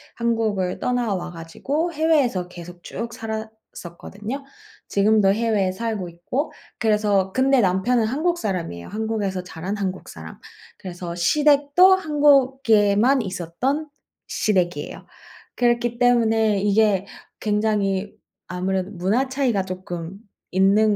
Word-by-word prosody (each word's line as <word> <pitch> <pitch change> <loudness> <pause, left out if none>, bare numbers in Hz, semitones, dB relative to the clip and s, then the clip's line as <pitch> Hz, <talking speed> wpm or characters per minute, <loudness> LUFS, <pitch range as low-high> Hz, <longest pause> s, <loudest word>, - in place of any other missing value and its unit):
한국을 220 -6 -1
떠나와 210 -8 -1
가지고 275 - -3
해외에서 290 - +1
계속 175 0 -11
쭉 235 0 -5
살았었거든요. 220 +1 -7 0.5
지금도 200 -1 +3
해외에 210 -4 +1
살고 210 -3 -3
있고. 175 - -3 0.3
그래서 210 -3 +2
근데 265 +1 +3
남편은 205 +5 +2
한국 315 +9 0
사람이에요. 170 - -4
한국에서 210 -4 -2
자란 180 +3 -5
한국 190 -2 -4
사람. 80 0 -10 0.4
그래서 175 -2 -7
시댁도 295 - +4
한국에만 265 - +3
있었던 215 - -3 0.4
시댁이에요. 175 -7 -1 0.5
그렇기 240 -1 +1
때문에 225 -4 +3
이게 205 -1 +2 0.3
굉장히 210 -2 0 0.3
아무래도 185 +2 -2
문화 210 +9 0
차이가 255 -8 0
쪼끔 185 -1 -7 0.3
있는 200 +3 +4
210 Hz, 285 characters per minute, -22 LUFS, 185-245 Hz, 0.5 s, 시댁도